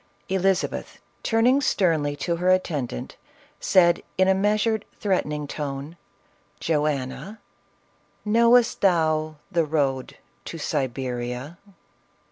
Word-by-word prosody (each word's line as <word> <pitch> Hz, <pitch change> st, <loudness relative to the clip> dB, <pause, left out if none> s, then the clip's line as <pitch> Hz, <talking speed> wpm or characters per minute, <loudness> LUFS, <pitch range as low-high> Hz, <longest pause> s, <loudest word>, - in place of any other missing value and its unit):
Elizabeth, 190 Hz, 0 st, 0 dB, 0.2 s
turning 245 Hz, +5 st, +3 dB
sternly 160 Hz, -, +1 dB
to 170 Hz, +4 st, -2 dB
her 180 Hz, +2 st, +1 dB
attendant, 150 Hz, -, -1 dB, 0.4 s
said 170 Hz, -2 st, +4 dB, 0.2 s
in 185 Hz, 0 st, +4 dB
a 190 Hz, -, +5 dB
measured, 210 Hz, +2 st, +1 dB, 0.2 s
threatening 150 Hz, -7 st, -1 dB
tone, 145 Hz, +2 st, -5 dB, 0.6 s
"Joanna, 150 Hz, +6 st, -2 dB, 0.9 s
knowtst 235 Hz, +2 st, +4 dB
thou 155 Hz, -4 st, +2 dB, 0.2 s
the 170 Hz, -3 st, +2 dB
road 140 Hz, -4 st, -1 dB, 0.3 s
to -, -, -6 dB
Siberia 125 Hz, +3 st, -3 dB
165 Hz, 95 wpm, -24 LUFS, 145-195 Hz, 0.9 s, a